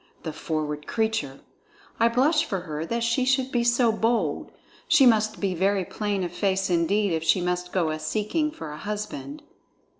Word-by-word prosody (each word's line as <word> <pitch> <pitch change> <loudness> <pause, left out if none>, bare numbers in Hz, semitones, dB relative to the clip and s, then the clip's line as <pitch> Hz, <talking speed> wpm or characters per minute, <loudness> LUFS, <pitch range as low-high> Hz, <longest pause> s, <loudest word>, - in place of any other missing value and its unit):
The 160 - -4
forward 150 -1 -3
creature! 220 -12 -1 0.6
I 230 - +5
blush 285 +7 +3
for 195 -5 -3
her 155 -1 -5
that 235 +3 -1
she 235 +2 +1
should 265 0 +1
be 240 -1 +1
so 240 0 +3
bold. 220 -8 0 0.4
She 305 -5 +6
must 215 -3 +3
be 195 -2 0
very 190 +2 +1
plain 205 -1 -2
of 175 - -3
face 190 +1 0
indeed 185 +3 +2
if 160 0 -1
she 165 +3 +3
must 180 0 -2
go 170 -4 +1
a 155 - -4
seeking 220 - -1
for 160 - -8
a 150 - -7
husband." 210 - -5
205 Hz, 180 wpm, -25 LUFS, 170-235 Hz, 0.6 s, She